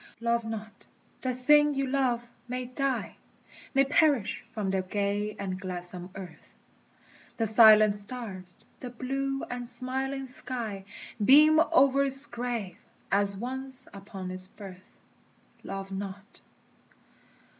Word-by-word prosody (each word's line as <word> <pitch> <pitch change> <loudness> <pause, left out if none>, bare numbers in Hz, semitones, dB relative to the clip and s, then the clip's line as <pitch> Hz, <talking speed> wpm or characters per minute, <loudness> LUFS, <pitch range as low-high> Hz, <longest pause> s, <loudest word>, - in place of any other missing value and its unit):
Love 235 0 0
not! 220 -1 -8 0.3
the 255 -1 -2
thing 295 +3 +4
you 275 0 0
love 255 -3 -1 0.2
may 250 +1 -4
die, 265 +2 -3 0.6
May 275 - +5
perish 280 - +1
from 205 -3 -3
the 190 -1 0
gay 205 +2 -2
and 190 -2 -5
gladsome 180 -1 -6
earth; 180 -4 -11 0.8
The 225 - 0
silent 215 -1 +7
stars, 200 -4 -8 0.2
the 250 - -7
blue 270 +2 -3
and 245 -1 -4
smiling 265 +2 -2
sky, 235 -6 -5 0.4
Beam 305 +6 +6
o'er 275 -4 +3
its 270 +1 +2
grave, 235 -7 -5 0.3
as 200 0 +5
once 260 +3 +4
upon 195 -2 -8
its 185 0 -1
birth. 190 -2 -13 0.7
Love 195 0 -7
not! 195 +2 -8
235 Hz, 120 wpm, -28 LUFS, 195-265 Hz, 0.8 s, silent